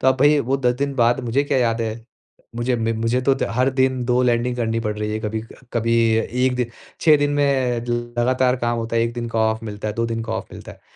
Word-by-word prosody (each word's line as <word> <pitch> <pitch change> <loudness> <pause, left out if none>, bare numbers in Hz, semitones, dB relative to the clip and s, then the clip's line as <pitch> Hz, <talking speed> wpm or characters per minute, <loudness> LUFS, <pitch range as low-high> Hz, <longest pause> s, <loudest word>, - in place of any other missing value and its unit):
तो 130 - +3
अब 130 - +3
भई, 145 +1 +5
वो 135 +2 0
10 125 -2 +1
दिन 140 0 -1
बाद 120 -1 +3
मुझे 120 +4 +1
क्या 140 - +1
याद 115 -2 +1
है? 110 - -1 0.7
मुझे, 120 +1 0
म 115 0 -1
मुझे 115 +2 +1
तो 135 - +6 0.2
हर 130 +3 +2
दिन 130 -1 +1
2 125 0 +2
लैंडिंग 120 0 +1
करनी 115 -1 -1
पड़ 105 -2 -3
रही 105 0 -2
हैं। 110 - -2
कभी, 110 0 -2
क 115 +3 -16
कभी 115 0 +1 0.5
एक 130 -1 +2
दि– 125 - 0 0.3
6 155 -3 +6
दिन 145 0 +1
में 135 -4 +1 0.4
लगातार 130 +1 +2
काम 120 -1 -1
होता 115 0 -3
है। 115 - +3
1 115 0 -1
दिन 120 -1 -4
का 115 - -2
ऑफ़ 110 +1 -5
मिलता 105 0 -5
है, 105 - -4
2 115 0 0
दिन 115 0 -3
का 115 - -4
ऑफ़ - - -4
मिलता - - -10
है, - - -19
120 Hz, 260 wpm, -21 LUFS, 115-130 Hz, 0.7 s, तो